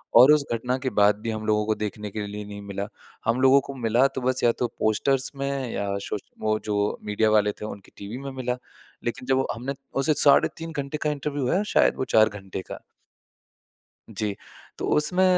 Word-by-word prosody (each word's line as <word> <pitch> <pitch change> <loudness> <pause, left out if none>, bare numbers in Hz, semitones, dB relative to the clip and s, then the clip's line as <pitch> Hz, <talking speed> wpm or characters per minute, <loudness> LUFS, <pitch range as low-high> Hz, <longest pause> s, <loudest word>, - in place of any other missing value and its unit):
और 130 +5 +9
उस 150 -2 +3
घटना 125 +3 -1
के 130 0 -1
बाद 105 0 +6
भी 115 - -3
हम 110 0 -4
लोगों 105 0 +2
को 110 0 +1
देखने 105 0 -4
के 105 -1 -4
लिए 105 0 -6
नहीं 100 0 -8
मिला। 100 0 -4 0.4
हम 115 +3 +1
लोगों 135 +1 +7
को 140 - -8
मिला 120 +1 +3
तो 130 - -2
बस 130 +1 0
या 120 - +6
तो 125 - +1
पोस्टर्स 130 +5 +1
में 140 -2 -2
या 100 - -2 0.2
सोश 105 - -3 0.2
वो 110 0 +1
जो 105 -1 0 0.3
मीडिया 105 +1 +2
वाले 105 -1 +4
थे - - -3
उनकी 100 -2 -9
टीवी 100 +5 -6
में 135 0 -6
मिला। 125 -1 -2 0.5
लेकिन 120 +2 -3
जब 130 0 +2
हमने 125 +5 -4 0.3
उसे 155 +3 +3
साढ़े 140 - +6
3 165 0 -6
घंटे 140 0 -3
का 150 - +1
इंटरव्यू 145 -2 -2
है 195 +3 +2
शायद - - +4
वो 130 - -1
4 110 0 +7
घंटे 95 -2 -7
का। - - -5 1.3
जी। 105 -2 -2 0.4
तो - - -3
उसमें 180 +5 +3
120 Hz, 205 wpm, -25 LUFS, 105-135 Hz, 1.3 s, और